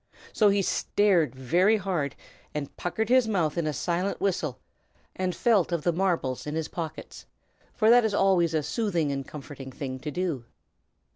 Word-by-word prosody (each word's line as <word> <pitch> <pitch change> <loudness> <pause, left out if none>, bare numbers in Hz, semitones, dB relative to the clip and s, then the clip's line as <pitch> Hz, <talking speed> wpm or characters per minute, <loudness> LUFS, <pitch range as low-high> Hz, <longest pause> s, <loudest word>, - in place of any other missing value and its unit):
So 210 -2 +4
he 200 0 +2
stared 185 -7 +2
very 175 - +3
hard, 180 -8 -2 0.4
and 145 -2 -4
puckered 220 +6 -2
his 255 -2 +5
mouth 175 -8 0
in 170 -3 -1
a - - +1
silent 175 +5 -1
whistle, 160 -9 -1 0.6
and 185 -1 -2
felt 215 -8 +2
of 170 -3 -1
the 175 - +2
marbles 165 -8 -1
in 150 - -3
his 160 -1 -2
pockets, 165 -3 -7 0.5
for 220 0 +4
that 245 0 +7
is 215 -2 0
always 175 -5 +3
a 155 - +1
soothing 165 -2 0
and 135 -1 -4
comforting 135 -2 -9
thing 130 0 -5
to 145 +3 -5
do. 155 -6 -2
170 Hz, 170 wpm, -27 LUFS, 150-195 Hz, 0.6 s, that